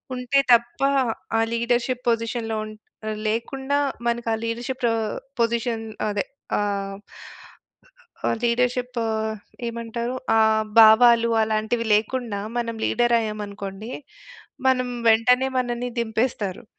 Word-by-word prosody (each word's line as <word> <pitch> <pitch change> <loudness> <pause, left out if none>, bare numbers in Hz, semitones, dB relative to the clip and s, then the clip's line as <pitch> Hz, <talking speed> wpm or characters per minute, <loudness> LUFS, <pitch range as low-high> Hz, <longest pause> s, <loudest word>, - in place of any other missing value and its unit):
ఉంటే 250 +2 +1
తప్ప 235 +2 +2 0.6
ఆ - - +3
లీడర్‌షిప్ 240 +2 0
పొజిషన్‌లో 230 -1 -1
ఉన్ 215 - -9 0.5
లేకుండా 265 +5 -1 0.3
మనకి 235 0 -1
ఆ - - +2
లీడర్‌షిప్ 240 +3 -3
ఆహ్, 220 -2 -2 0.3
పొజిషన్ 230 -1 0 0.2
అదె 205 -1 -1 0.3
ఆహ్... 200 -1 -2 1.3
ఆ - - +3
లీడర్‌షిప్ 245 +1 0
ఆహ్, 220 0 -2 0.3
ఏమంటారు 235 +1 -4 0.2
ఆహ్, 220 0 +4 0.2
భావాలు 230 +1 +7
అలాంటివి 220 +2 0
లేకుండా 220 -1 -1 0.2
మనం 235 -1 -1
లీడర్ 240 0 +2
అయ్యామనుకోండి. 210 0 -6 0.8
మనం 255 -1 +2 0.2
వెంటనే 250 +4 +4
మనల్ని 245 0 -2
దింపేస్తారు. 220 -2 -1
230 Hz, 105 wpm, -23 LUFS, 220-245 Hz, 1.3 s, భావాలు